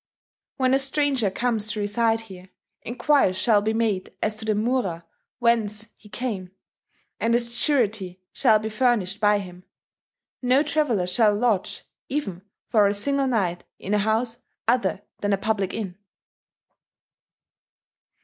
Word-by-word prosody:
"When 260 Hz, -1 st, +2 dB
a 270 Hz, -, +4 dB
stranger 270 Hz, -5 st, +1 dB
comes 220 Hz, +1 st, 0 dB
to 215 Hz, 0 st, -3 dB
reside 225 Hz, +2 st, +1 dB
here, 190 Hz, -4 st, -12 dB, 0.3 s
enquiries 245 Hz, -5 st, +2 dB
shall 210 Hz, +1 st, +4 dB
be 215 Hz, +1 st, 0 dB
made 220 Hz, -4 st, -1 dB
as 215 Hz, -, +1 dB
to 220 Hz, -, -6 dB
the 215 Hz, -1 st, +1 dB
mura 210 Hz, -7 st, -1 dB, 0.3 s
whence 220 Hz, -3 st, +1 dB
he 210 Hz, -, -18 dB
came, 210 Hz, -4 st, -4 dB, 0.7 s
and 230 Hz, +1 st, +2 dB
a -, -, +4 dB
surety 230 Hz, -, -1 dB
shall 225 Hz, -6 st, +4 dB
be 215 Hz, +1 st, -4 dB
furnished 215 Hz, -4 st, +1 dB
by 210 Hz, -1 st, +4 dB
him.... 180 Hz, -2 st, -8 dB, 0.8 s
No 255 Hz, +3 st, +4 dB
traveller 285 Hz, -11 st, +1 dB
shall 210 Hz, +3 st, +3 dB
lodge, 215 Hz, -3 st, 0 dB, 0.3 s
even 225 Hz, -11 st, -3 dB, 0.3 s
for 210 Hz, -3 st, +4 dB
a 200 Hz, -, 0 dB
single 275 Hz, +6 st, 0 dB
night, 190 Hz, -8 st, 0 dB
in 200 Hz, -, -4 dB
a 210 Hz, -, +3 dB
house 225 Hz, +3 st, 0 dB, 0.3 s
other 205 Hz, -6 st, +1 dB, 0.2 s
than 205 Hz, 0 st, 0 dB
a -, -, +2 dB
public 195 Hz, -2 st, -1 dB
inn. 195 Hz, -4 st, -5 dB
220 Hz, 140 wpm, -24 LUFS, 200-245 Hz, 0.8 s, a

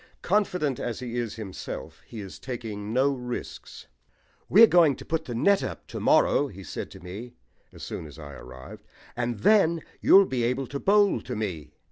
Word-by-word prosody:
Confident 180 Hz, -, 0 dB
as 120 Hz, -, -3 dB
he 120 Hz, -2 st, -6 dB
is 120 Hz, -3 st, -3 dB
himself, 90 Hz, -7 st, -7 dB
he 115 Hz, -3 st, -8 dB
is 95 Hz, -2 st, -9 dB
taking 110 Hz, -5 st, -6 dB
no 135 Hz, +4 st, +2 dB
risks. 125 Hz, -2 st, -7 dB, 0.6 s
"We're 220 Hz, +5 st, +9 dB
going 170 Hz, -8 st, +4 dB
to -, -, -12 dB
put 160 Hz, 0 st, -2 dB
the 120 Hz, -, -5 dB
net 195 Hz, +11 st, +3 dB
up -, -, -6 dB
to -, -, -5 dB
morrow," 145 Hz, -, +3 dB
he 95 Hz, -6 st, -11 dB
said 80 Hz, -, -6 dB
to -, -, -12 dB
me 100 Hz, +8 st, -9 dB, 0.4 s
as -, -, -12 dB
soon 80 Hz, -, -6 dB
as 75 Hz, 0 st, -13 dB
I 75 Hz, -3 st, -9 dB
arrived, 65 Hz, 0 st, -12 dB, 0.3 s
"and 120 Hz, -3 st, -3 dB
then 170 Hz, -, +4 dB, 0.2 s
you'll 195 Hz, 0 st, +7 dB
be 130 Hz, -7 st, -2 dB
able 125 Hz, +3 st, 0 dB
to 140 Hz, +3 st, -5 dB
bowl 205 Hz, +3 st, +3 dB
to 125 Hz, -, -6 dB
me. 85 Hz, -9 st, -5 dB
120 Hz, 185 wpm, -26 LUFS, 100-150 Hz, 0.6 s, We're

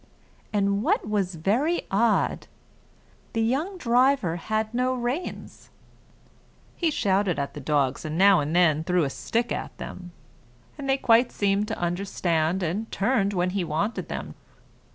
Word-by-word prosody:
And 200 Hz, -1 st, +1 dB
what 215 Hz, -, +1 dB
was 195 Hz, -4 st, -1 dB
very 240 Hz, -, 0 dB
odd 220 Hz, +3 st, +1 dB, 0.9 s
the 225 Hz, -, 0 dB
young 300 Hz, -, -1 dB
driver 245 Hz, -, +2 dB
had 215 Hz, +5 st, -2 dB
no 255 Hz, +1 st, +1 dB
reins; 250 Hz, +8 st, -5 dB, 1.1 s
he 335 Hz, -, +1 dB
shouted 195 Hz, -, +1 dB
at 140 Hz, 0 st, -3 dB
the -, -, -7 dB
dogs 140 Hz, -2 st, 0 dB
and 155 Hz, +1 st, -4 dB
now 195 Hz, 0 st, +6 dB
and 150 Hz, +3 st, -2 dB
then 160 Hz, -3 st, +4 dB
threw 180 Hz, 0 st, +1 dB
a 140 Hz, -, -1 dB
stick 235 Hz, -, -2 dB
at -, -, -4 dB
them, 180 Hz, -1 st, -8 dB, 0.6 s
and 280 Hz, -2 st, -6 dB
they 270 Hz, -, +3 dB
quite 235 Hz, -1 st, +4 dB
seemed 200 Hz, +1 st, 0 dB
to -, -, -4 dB
understand, 175 Hz, -1 st, -1 dB
and 195 Hz, +7 st, -3 dB
turned 205 Hz, -1 st, +1 dB
when 180 Hz, -1 st, 0 dB
he 195 Hz, -1 st, -1 dB
wanted 170 Hz, +8 st, -2 dB
them. -, -, -5 dB
200 Hz, 150 wpm, -25 LUFS, 175-235 Hz, 1.1 s, now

